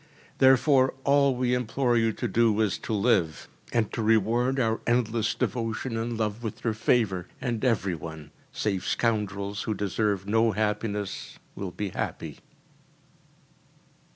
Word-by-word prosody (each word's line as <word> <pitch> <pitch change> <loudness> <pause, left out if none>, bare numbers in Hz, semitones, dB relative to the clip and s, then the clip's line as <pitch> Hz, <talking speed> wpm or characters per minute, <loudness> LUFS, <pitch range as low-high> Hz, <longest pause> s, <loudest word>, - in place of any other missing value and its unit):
Therefore 130 0 +5
all 140 -1 +4
we 125 0 0
implore 125 +1 +1
you 115 -1 +3
to - - -3
do 115 -2 +2
is 105 -4 +1
to - - -6
live, 100 -7 +1 0.2
and 115 -3 0
to 115 - -2
reward 115 +4 +2
our 115 -2 +1
endless 115 -2 +1
devotion 115 +1 -2
and 115 +1 -2
love 110 0 -2
with 110 -3 -6
your 115 - +1
favour, 105 -5 +1
and 120 -3 -3
every 105 -7 +1
one, 80 -2 -8 0.2
save 100 -4 -2
scoundrels 105 -3 -1
who 110 - -2
deserve 100 0 -1
no 110 +1 +3
happiness, 105 -1 -2 0.2
will 95 - -5
be 100 +2 -4
happy. - - -5
110 Hz, 140 wpm, -27 LUFS, 105-120 Hz, 0.2 s, Therefore